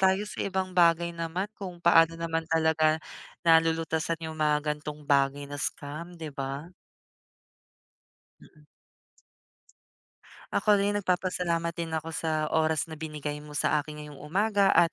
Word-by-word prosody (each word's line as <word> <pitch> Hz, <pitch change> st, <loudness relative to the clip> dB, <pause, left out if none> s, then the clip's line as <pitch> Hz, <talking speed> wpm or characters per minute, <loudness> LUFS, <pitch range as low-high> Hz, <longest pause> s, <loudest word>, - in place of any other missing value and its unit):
tayo 190 Hz, +1 st, +3 dB
sa -, -, -7 dB
ibang 190 Hz, -1 st, -2 dB
bagay 170 Hz, -1 st, +4 dB
naman, 170 Hz, +4 st, -3 dB
kung 180 Hz, -4 st, -7 dB
paano 165 Hz, -1 st, +6 dB
naman 165 Hz, -1 st, -2 dB
talaga, 160 Hz, -1 st, +3 dB, 0.5 s
nalulutasan 165 Hz, 0 st, +2 dB
yung 160 Hz, 0 st, -7 dB
mga 150 Hz, 0 st, +2 dB
gan'tong 150 Hz, 0 st, -8 dB
bagay 140 Hz, 0 st, +2 dB
na 145 Hz, 0 st, -7 dB
scam, 160 Hz, +6 st, -5 dB
'di 160 Hz, -3 st, -7 dB
ba? 140 Hz, +5 st, -5 dB, 1.7 s
Mm. 150 Hz, -1 st, -20 dB, 1.9 s
Ako 210 Hz, -1 st, +4 dB
rin, 200 Hz, +1 st, +1 dB
nagpapasalamat 180 Hz, -3 st, 0 dB
din 170 Hz, 0 st, -4 dB
ako 160 Hz, +1 st, -4 dB
sa 155 Hz, -1 st, -1 dB
oras 160 Hz, -1 st, +2 dB
na 165 Hz, -, -11 dB
binigay 150 Hz, -2 st, -5 dB
mo 150 Hz, 0 st, -9 dB
sa 150 Hz, +2 st, +2 dB
akin 150 Hz, +1 st, -9 dB
ngayong 150 Hz, -2 st, -10 dB
umaga, 200 Hz, +5 st, +2 dB
at 170 Hz, -3 st, +5 dB
160 Hz, 135 wpm, -28 LUFS, 150-170 Hz, 1.9 s, paano